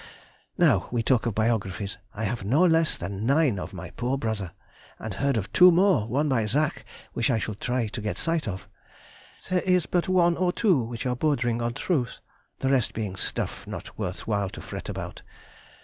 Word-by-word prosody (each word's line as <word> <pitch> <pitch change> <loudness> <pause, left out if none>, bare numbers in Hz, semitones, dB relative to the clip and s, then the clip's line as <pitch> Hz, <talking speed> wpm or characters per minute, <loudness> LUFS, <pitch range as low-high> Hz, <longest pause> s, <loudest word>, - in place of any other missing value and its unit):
Now 125 - +4
we 120 -1 0
talk 125 -1 +2
of 110 - -2
biographies, 105 -3 -1 0.2
I 110 - -4
have 110 0 -2
no 135 - +3
less 165 -2 +3
than 100 +3 -5
nine 135 - +3
of - - -6
my 90 -1 -8
poor 125 +2 -1
brother, 110 -7 -3 0.5
and 110 -2 -6
heard 135 +4 0
of 100 - -4
two 180 0 +8
more, 175 - +3
one 140 +6 +1
by 115 -6 +1
Zach, 150 +8 0 0.3
which 115 - 0
I 120 - +3
shall 110 0 -3
try 120 +4 -1
to 110 - -5
get 105 0 -3
sight 165 -4 0
of. 95 -2 -5 0.8
There 180 -1 +3
is 180 -3 +2
but 175 0 0
one 175 -2 +4
or 180 0 +2
two 185 - +3
which 115 +2 -5
are 125 -1 0
bordering 120 -4 0
on 120 0 -2
truth, 140 -10 -1 0.4
the 135 - -1
rest 130 -4 +2
being 105 -4 -3
stuff, - - -3
not - - -7
worth 90 -4 -4
while 100 -3 0
to - - -9
fret - - -7
about. - - -6
120 Hz, 195 wpm, -26 LUFS, 105-155 Hz, 0.8 s, two